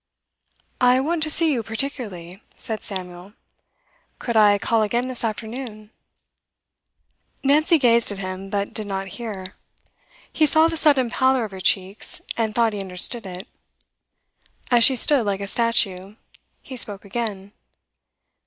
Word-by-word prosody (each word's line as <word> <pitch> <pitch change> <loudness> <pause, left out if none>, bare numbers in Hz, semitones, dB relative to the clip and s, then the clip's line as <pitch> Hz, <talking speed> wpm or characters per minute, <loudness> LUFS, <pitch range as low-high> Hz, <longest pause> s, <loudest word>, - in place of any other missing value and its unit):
'I 250 +1 +5
want 320 +4 -1
to 310 - -1
see 320 0 +2
you 240 - -1
particularly,' 220 -6 -4
said 220 -2 -3
Samuel. 185 0 -7 0.8
'Could 235 - -4
I 210 -2 +6
call 225 +2 +1
again, 240 +4 0
this 255 -2 -5
afternoon?' 220 -1 -5 1.5
Nancy 305 +4 +4
gazed 235 -5 +5
at 205 - -5
him, 190 0 -6
but 200 0 -2
did 215 -2 -4
not 195 -1 -4
hear. 200 -5 -6 0.8
He 310 - +3
saw 315 +2 +5
the 330 - -3
sudden 280 -6 +3
pallor 260 -1 +2
of 210 - -9
her 190 - -8
cheeks, 190 +2 0 0.2
and 220 -2 -2
thought 230 -2 +2
he 205 - -4
understood 195 +4 0
it. 185 +2 -8 1.2
As 240 -1 +5
she 265 - +6
stood 275 0 +5
like 200 -2 -1
a 200 - -4
statue, 205 -3 0 0.5
he 265 - -9
spoke 205 -4 -6
again. 200 -2 -4
220 Hz, 145 wpm, -22 LUFS, 195-255 Hz, 1.5 s, I